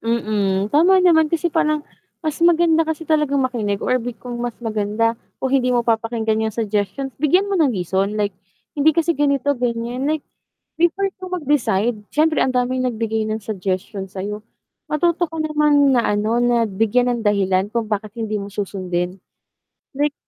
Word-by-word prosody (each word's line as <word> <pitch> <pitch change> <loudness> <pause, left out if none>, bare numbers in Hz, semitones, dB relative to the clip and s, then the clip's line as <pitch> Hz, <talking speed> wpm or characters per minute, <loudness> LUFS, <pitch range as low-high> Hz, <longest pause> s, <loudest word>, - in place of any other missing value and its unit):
Mm, 210 -4 0
tama 345 +6 +5
naman 320 -3 +5
kasi 335 0 -1
parang 305 -1 +1 0.4
mas 310 -1 -2
maganda 335 -1 +4
kasi 320 +1 -3
talagang 300 -3 +1
makinig 215 -6 -2
or 255 0 +2
'di 240 0 -5
kung 245 -1 -7
mas 240 -2 -3
maganda, 220 +1 0 0.2
kung 265 - -2
hindi 255 -2 +2
mo 240 - +2
papakinggan 220 -1 0
'yung 215 - -8
suggestions 220 +5 -2
bigyan 360 +8 +2
mo 390 - +1
ng 310 -4 +4
reason 190 +2 -1
like, 205 -1 0 0.5
hindi 310 +2 +4
kasi 335 0 +2
ganito, 285 -1 +1
ganiyan 245 +1 -2
like, 310 -1 -1 0.6
before 345 +4 +2
ka 370 - -6
mag-decide, 255 - 0
siyempre 310 +1 +2
ang 255 -1 +1
daming 255 +1 0
nagbigay 220 -2 -2
ng 215 0 -3
suggestion 195 -1 -4
sa'yo, 200 +2 -5 0.5
matuto 340 +3 +1
ka 325 - -8
naman 300 -2 +3
na 245 - +4
ano 215 +3 0
na 240 -1 +3
bigyan 225 +4 +1
ng 235 - -2
dahilan 195 -1 +2
kung 235 -1 -1
bakit 210 0 -3
hindi 215 -2 -2
mo 200 - -6
susundin. 185 -2 -3 0.8
Like 290 0 +1
240 Hz, 165 wpm, -20 LUFS, 210-300 Hz, 0.8 s, tama